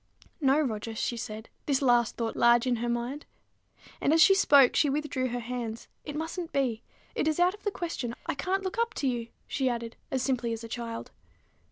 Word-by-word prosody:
"No, 275 +1 +4
Roger," 225 -5 -2
she 235 - -1
said, 220 -1 -6 0.2
this 275 -2 +2
last 240 -4 +3
thought 230 -1 -2
large 235 0 +5
in 250 -2 +1
her 240 +1 -2
mind; 240 +5 -3 0.7
and, - - +3
as 325 - +4
she 390 +5 +8
spoke, 285 -9 +6
she 295 - +4
withdrew 280 -2 -1
her 245 0 -3
hands, 235 -2 -5 0.2
"it 295 - -6
mustn't 325 +2 -4
be. 250 -5 0 0.3
It - - 0
is 315 +1 +1
out 355 +1 +4
of 415 - -13
the 410 - 0
question: 330 - -4
I - - -1
can't 370 +7 -1
look 375 +4 -3
up 465 -1 0
to 275 - -1
you," 240 -2 -1 0.2
she 265 -2 0
added, 235 -1 -4
as 260 -1 -1
simply 245 -3 0
as 225 0 -6
a - - -6
child. 230 0 -5
255 Hz, 210 wpm, -29 LUFS, 235-300 Hz, 0.7 s, she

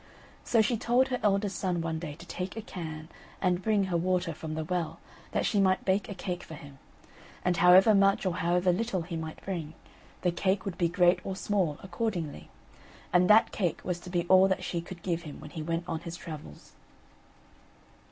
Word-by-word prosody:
So 225 -2 +3
she 235 +2 +1
told 245 +4 +2
her 250 -1 -1
eldest 200 -1 +1
son 180 -3 0
one 165 -1 -2
day 155 -3 -6
to 170 +3 -13
take 180 +3 -5
a - - -3
can 160 -6 -7 0.3
and 180 -1 +1
bring 210 -1 +2
her 185 -3 0
water 180 0 0
from 155 +1 -6
the 160 - -2
well, 175 0 -2 0.3
that - - 0
she 205 - +2
might 190 -1 +2
bake 195 +2 +1
a 200 - -5
cake 180 -1 -4
for 160 - -9
him; 145 -3 -13 0.7
and 180 -1 +2
however 185 +5 +7
much 195 0 +3
or 180 -1 0
however 180 +2 +2
little 195 -1 -1
water 165 - -10
he - - -1
might 160 -1 -6
bring, 165 -5 -4 0.5
the 180 - +3
cake 190 +2 0
would 190 -3 -5
be 170 -2 +2
great 175 0 +3
or 190 - -4
small 190 -7 0
accordingly, 180 -4 -3 0.6
and 180 0 +4
that 215 +1 +6
cake 180 -6 -1
was 180 -1 -2
to 180 - -10
be 175 -1 0
all 185 +2 +6
that 190 - -1
she 170 - -2
could 170 0 -10
give 170 -2 -1
him 155 -4 -9
when 150 - -10
he 160 - -5
went 165 +2 -2
on 165 -2 -2
his 170 0 -7
travels. 150 - -10
180 Hz, 210 wpm, -29 LUFS, 165-195 Hz, 0.7 s, however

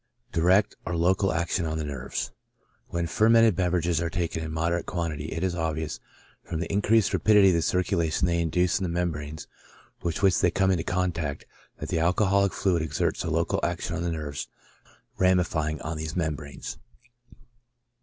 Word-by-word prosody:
Direct 95 +5 +3
or 85 0 -3
local 95 +3 +2
action 85 +2 0
on 80 0 -2
the 80 - -2
Nerves. 70 -4 -4 0.3
— - - -41
When 85 0 -1
fermented 115 +3 +4
beverages 90 -2 +1
are 85 - -1
taken 85 -2 -2
in 80 - -5
moderate 85 +2 -1
quantity, 80 -4 -3
it 80 +2 -4
is 95 -2 0
obvious, 80 -2 -2 0.4
from 80 - -4
the 85 +3 -3
increased 105 +1 +3
rapidity 95 +2 +5
of - - +3
the 85 - +2
circulation 85 -2 +1
they 85 -1 +1
induce 90 +3 +1
in - - -3
the 90 - -1
membranes 80 -3 -3 0.6
with 85 +4 -2
which 95 -2 +4
they 90 - +4
come 95 +2 +2
into 85 -3 0
contact, 85 -6 -2 0.3
that - - -6
the 80 - 0
alcoholic 100 +3 +3
fluid 90 -4 +1
exerts 75 -2 -1
a - - -2
local - - 0
action 85 +1 -2
on 90 - -3
the 85 - -1
nerves 75 -3 -4 0.7
rami 90 -1 +4
fying 80 -3 -2
on 80 +1 -4
these 80 +1 -5
membranes. 80 -4 -4
85 Hz, 175 wpm, -26 LUFS, 80-90 Hz, 0.7 s, rapidity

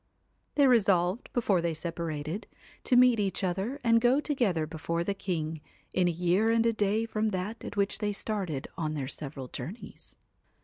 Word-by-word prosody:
They 285 - +5
resolved, 200 -5 +3
before 205 -7 +2
they 170 -1 -1
separated, 165 +2 -4 0.4
to 250 - +3
meet 250 -2 +6
each 195 -1 0
other 195 +9 -1
and 230 -1 +4
go 250 +3 +4
together 235 - 0
before 165 +2 -2
the 200 - -1
king, 160 -5 -3 0.3
in 185 -1 +3
a - - +2
year 180 +6 +2
and 230 0 +3
a 230 - +3
day 215 +1 +1
from 220 -1 -1
that 210 +3 -3
at - - -7
which 200 0 +1
they 210 -1 0
started 195 -9 -3
on 155 -3 -2
their 135 -3 -3
several 135 -2 -6
journeys. 195 - -8
195 Hz, 175 wpm, -29 LUFS, 165-225 Hz, 0.4 s, meet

